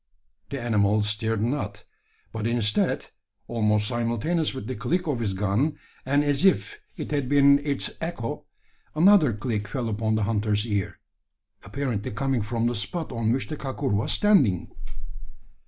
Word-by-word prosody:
The 140 - -4
animal 105 -3 +2
stirred 110 +1 -1
not; 105 -5 -2 0.5
but 110 0 -3
instead 115 -3 +1 0.4
almost 105 -2 +1
simultaneous 120 +8 0
with 130 -5 -7
the 130 +3 -4
click 180 - -1
of 145 -6 -1
his 105 -4 -1
gun, 105 +10 0 0.3
and 140 +2 +3
as 145 +1 +1
if 145 - +2 0.2
it - - -5
had 140 -4 -1
been 140 0 +6
its 145 -1 -2
echo 160 -9 -4 0.5
another 170 - +6
click 105 -1 -3
fell 125 -2 -3
upon 110 0 0
the 110 - +1
hunter's 105 0 0
ear, 100 -4 -2 0.7
apparently 130 -7 -3
coming 135 +2 -1
from 115 +2 -1
the 120 - +1
spot 155 - -4
on 115 -2 0
which 130 +2 -1
the 155 - -5
kakur 135 0 -3
was 110 +9 0
standing! 150 - +3
120 Hz, 155 wpm, -25 LUFS, 105-140 Hz, 0.7 s, been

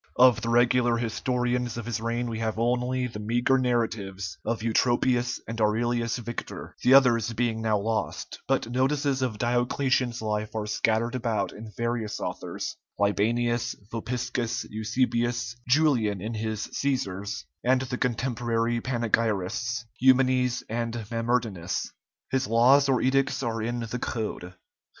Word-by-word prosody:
Of 125 -2 +6
the 115 - -2
regular 120 0 +3
historians 125 +1 -1
of 115 - -5
his 115 -1 -3
reign 120 +1 -1
we 115 -1 -4
have 110 -1 -2
only 125 +2 +1
the 115 -4 -6
meagre 120 +5 +2
narratives 110 -7 -1
of 115 -1 -2
Eutropius 120 +2 +2
and 115 0 -4
Aurelius 115 +2 +1
Victor, 120 0 -6
the 130 +2 +6
others 120 -4 +5
being 115 -1 0
now 110 -1 +2
lost; 110 +2 -3
but 135 -3 +1
notices 135 +1 +1
of 125 -5 -1
Diocletian's 120 +1 +1
life 105 0 -2
are 110 -1 -1
scattered 110 +2 +1
about 115 -4 -1
in 110 +1 -9
various 115 -2 -2
authors, - - -4 0.2
Libanius, 115 +4 +1 0.2
Vopiscus, 120 0 -2
Eusebius, 120 +2 0
Julian 125 -8 +3
in 110 +5 -4
his 110 0 -3
"Cæsars," 100 -8 -2 0.2
and 130 +1 +3
the 125 -1 -3
contemporary 120 -1 0
panegyrists, 115 -1 0
Eumenes 130 -1 +3
and 115 +1 -2 0.2
Mamertinus. 115 -6 -1 0.4
His 130 0 +1
laws 130 +5 +5
or 130 -2 +2
edicts 135 +1 +1
are 115 -2 -2
in 120 +2 -2
the 115 +2 -4
"Code." 105 -7 -4
120 Hz, 135 wpm, -27 LUFS, 110-125 Hz, 0.4 s, Of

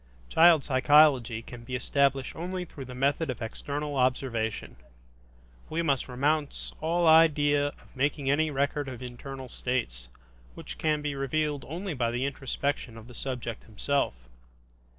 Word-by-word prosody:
Child 165 -3 +6
psychology 130 -4 +4
can 120 0 -10
be 125 +2 -5
established 135 +1 +1
only 180 +2 -4
through 140 -5 -9
the 125 0 -9
method 140 +4 +1
of 125 - -3
external 145 +5 -4
observation. 125 - -1 0.9
We 165 +2 -1
must 140 -5 +1
renounce 145 +4 -1
all 170 +2 +1
idea 150 -3 +5
of 145 - -12
making 140 +1 0
any 155 +3 +3
record 140 0 -1
of 125 -1 -8
internal 130 +2 -7
states, 115 - -3 0.5
which - - -9
can 150 -1 +1
be 145 -1 -1
revealed 145 +1 -1
only 175 +5 -4
by 120 -4 0
the 120 +3 -1
introspection 140 -3 -3
of 110 - -11
the 125 - -13
subject 120 -2 -5
himself. 135 - -1
140 Hz, 145 wpm, -28 LUFS, 125-150 Hz, 0.9 s, Child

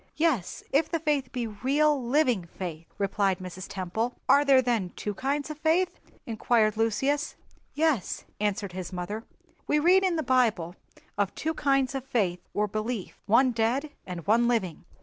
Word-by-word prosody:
"Yes, 305 - 0
if 295 +3 +2
the 330 - -1
faith 295 -5 0
be 245 -3 -2
real, 270 +6 +1
living 245 - +2
faith," 170 -3 -5
replied 195 -1 +1
Mrs. 185 +1 -8
Temple. 205 +6 -2
"Are 285 - +6
there 275 -2 +6
then 235 -7 0
two 210 - -3
kinds 280 +7 -2
of 305 - -8
faith?" 335 +4 +1 0.3
inquired 220 -1 +2
Lucius. 250 +7 0 0.4
"Yes," 300 - 0
answered 205 -2 -1
his 185 -1 -5
mother; 195 +5 -5 0.4
"we 300 - +3
read 360 +5 +5
in 370 -3 +2
the 315 - -1
Bible 225 - +2 0.4
of 200 -2 0
two 320 +1 -2
kinds 275 -3 +1
of 270 -2 -3
faith 195 -9 0 0.2
or 210 - +2
belief—one 225 +3 0
dead 245 +6 0 0.2
and 175 -3 -6
one 230 +3 +4
living." 190 -10 -1
235 Hz, 160 wpm, -27 LUFS, 200-285 Hz, 0.4 s, Are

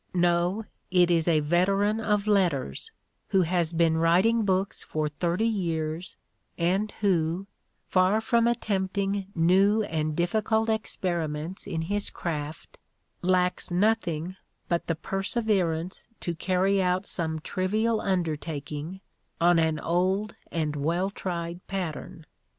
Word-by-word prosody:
No, 175 +4 +2 0.2
it 180 -1 +4
is 165 -1 +2
a 160 -3 +4
veteran 195 +7 +2
of 210 -2 +1
letters, 175 - +1 0.4
who 190 - +3
has 170 -1 0
been 165 -1 +2
writing 190 +8 +4
books 190 0 0
for 155 -1 -2
thirty 170 +7 -1
years 170 -5 -2 0.4
and 190 +5 +1
who, 175 -2 +1 0.4
far 185 +3 +3
from 230 +1 +2
attempting 200 -3 -1
new 195 +6 +4
and 155 -4 -2
difficult 220 +6 +1
experiments 175 -6 -2
in 160 -1 -2
his 205 +4 -1
craft, 155 -2 -5 0.4
lacks 180 0 +1
nothing 185 -3 0 0.3
but 170 -2 -1
the 165 - 0
perseverance 190 -2 -1
to 175 - -2
carry 190 +3 +1
out 180 +1 +1
some 160 -4 -2
trivial 215 +7 0
undertaking 160 -1 -3 0.4
on 175 0 +5
an 160 -1 +1
old 185 +5 0 0.2
and 155 -3 -1
well 170 +7 0
tried 170 -3 -4
pat 185 -5 -2
tern. 155 +1 -10
180 Hz, 120 wpm, -27 LUFS, 165-200 Hz, 0.4 s, on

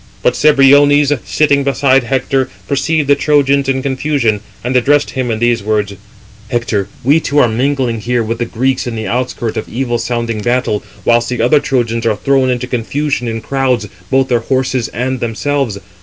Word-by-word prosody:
But - - +3
Cebriones, 145 0 +5
sitting 145 -2 +2
beside 135 -1 +2
Hector, 135 +1 0 0.2
perceived 145 +2 0
the 140 - +5
Trojans 140 -1 +2
in 130 -1 0
confusion, 130 -5 0 0.2
and 125 +2 -2
addressed 145 +4 +2
him 130 -2 -2
in 110 - -1
[these] 120 0 +1
words: 105 -1 -1 0.6
"Hector, 110 -5 -1 0.2
we 145 +6 +4
two 145 -2 -2
are 135 - +5
mingling 125 0 -1
here 120 +2 -1
with 115 +1 -3
the 120 - 0
Greeks 130 +3 -1
in 120 - -4
the 110 -1 -4
outskirt 120 -2 -2
of - - -4
evil 120 0 -2
sounding 115 -3 -2
battle, 120 -2 0 0.2
whilst 120 0 +2
the 125 - -3
other 125 +6 +4
Trojans 115 -4 -1
are 110 - +2
thrown 130 +5 +1
into 125 0 -1
confusion 125 +2 -2
in 115 0 -3
crowds, 130 -5 -1 0.2
both 135 0 +2
their 120 -2 +2
horses 130 0 -1
and 130 +2 -3
themselves. 120 0 -2
125 Hz, 175 wpm, -14 LUFS, 115-140 Hz, 0.6 s, Cebriones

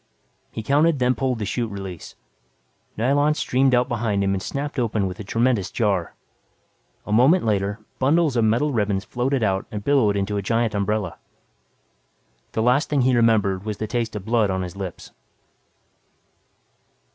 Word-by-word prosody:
He 110 - -6
counted 145 +5 +3
then 125 -1 +2
pulled 130 0 -1
the 105 - -3
chute 115 +3 -2
release. 95 -4 -8 0.8
Nylon 145 +6 +2
streamed 130 -2 +2
out 125 0 +2
behind 110 -5 -1
him 95 0 +1
and 95 - -2
snapped 140 +6 -4
open 110 -4 0
with 95 0 -5
a - - -5
tremendous 115 -1 0
jar. 100 -7 -1 0.9
A - - -6
moment 130 - +4
later, 100 -1 0 0.2
bundles 150 +1 +2
of 115 - +2
metal 120 +7 +2
ribbons 105 -3 0
floated 130 0 -1
out 95 -1 0
and 105 -1 -6
billowed 115 -7 +2
into 100 +1 -1
a - - -1
giant 115 +3 0
umbrella. 100 -2 -2 1.3
The 110 - 0
last 125 +6 +2
thing 145 -2 +2
he 125 0 +3
remembered 105 -5 +2
was 105 -1 -4
the 110 - -3
taste 115 0 -3
of 100 -2 -6
blood 110 -2 +2
on 95 -1 -1
his 90 +1 -7
lips. 95 -3 -7
110 Hz, 165 wpm, -23 LUFS, 100-130 Hz, 1.3 s, moment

